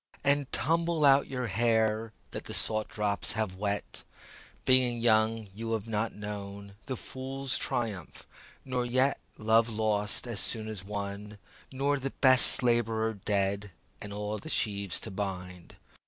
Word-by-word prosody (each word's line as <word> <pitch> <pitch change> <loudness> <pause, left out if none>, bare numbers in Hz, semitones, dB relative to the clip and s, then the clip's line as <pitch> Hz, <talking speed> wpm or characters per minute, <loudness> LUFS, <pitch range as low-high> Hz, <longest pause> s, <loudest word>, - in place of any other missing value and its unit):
And 140 -1 +2
tumble 165 +3 +1
out 140 0 +5
your 125 -2 -3
hair 110 +1 +1 0.2
That - - -5
the - - -2
salt 110 -1 +2
drops 105 -1 0
have 105 -4 -2
wet; 100 0 -3 0.6
Being 130 -2 +4
young 110 -1 +2
you 115 +2 -4
have 110 -1 -3
not 110 0 -2
known 100 -1 -7
The 130 -2 -3
fool's 135 +2 -4
triumph, 105 -8 -3 0.4
nor 125 -2 -1
yet 130 +3 +2 0.2
Love 110 +2 +3
lost 105 -1 0
as 115 -5 -1
soon 110 -2 +1
as 105 -4 -5
won, 100 +1 -5 0.3
Nor 140 +2 0
the 135 +1 -2
best 130 -1 +7
labourer 115 -2 +1
dead 100 -1 -1 0.3
And 105 - -4
all 105 +1 -4
the 155 - -9
sheaves 100 - 0
to 110 - -6
bind. 90 -3 -5
110 Hz, 145 wpm, -29 LUFS, 100-125 Hz, 0.6 s, best